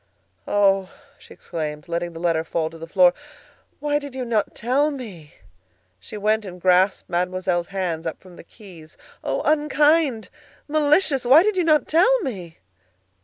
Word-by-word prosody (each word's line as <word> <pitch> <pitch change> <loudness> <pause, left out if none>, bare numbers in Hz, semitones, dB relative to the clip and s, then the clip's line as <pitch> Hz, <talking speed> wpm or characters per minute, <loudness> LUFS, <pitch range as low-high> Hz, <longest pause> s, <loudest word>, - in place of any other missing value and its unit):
"Oh!" 195 -2 +2 0.3
she - - -18
exclaimed, 150 -2 -6
letting 170 0 -3
the 165 - -9
letter 165 -2 0
fall 160 -1 -3
to 165 - -12
the 165 - -8
floor. 180 0 +4 0.7
"Why 295 0 0
did 285 -2 -10
you 255 -1 -4
not 220 -3 -1
tell 270 +6 +1
me?" 205 - -9 0.6
She 215 - -9
went 215 +1 +1
and 180 -2 -9
grasped 185 +2 +2
Mademoiselle's 180 0 -1
hands 175 -4 -3
up 160 - -5
from 185 -2 -16
the - - -13
keys. 170 -6 -15 0.3
"Oh! - - -2
unkind! 300 -4 +2 0.4
malicious! 300 -1 +2
Why 270 +7 +6
did 425 0 0
you 365 - +1
not 310 -2 +2
tell 380 +11 +4
me?" 185 - -6
195 Hz, 160 wpm, -22 LUFS, 175-290 Hz, 0.7 s, Why